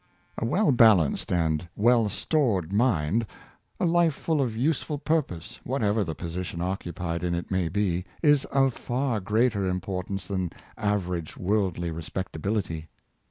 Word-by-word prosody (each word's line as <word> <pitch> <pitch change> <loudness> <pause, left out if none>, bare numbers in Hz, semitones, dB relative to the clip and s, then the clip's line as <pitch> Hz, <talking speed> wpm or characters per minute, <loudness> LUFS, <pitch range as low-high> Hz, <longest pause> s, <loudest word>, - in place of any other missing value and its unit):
A - - -1
well 185 - +3
balanced 110 - +4
and 80 -1 +1
well 115 0 +4
stored 100 - 0
mind, 110 -2 +2 0.5
a - - +2
life 170 -3 +3
full 155 0 0
of 115 -4 -1
useful 150 +3 0
purpose, 145 - -2
what 130 -1 -2
ever 105 +1 +2
the 80 -4 -4
position 85 +1 -5
occupied 90 -2 -3
in 85 -1 0
it 85 - -5
may 95 -3 +1
be, 90 -1 0 0.2
is 145 -3 +5
of 135 -2 +2
far 125 -1 -1
greater 105 0 +1
importance 90 +1 -3
than 95 -3 -2 0.2
average 90 -6 -2
worldly 90 -3 0
respectability. 80 +1 -3
100 Hz, 140 wpm, -27 LUFS, 85-120 Hz, 0.5 s, is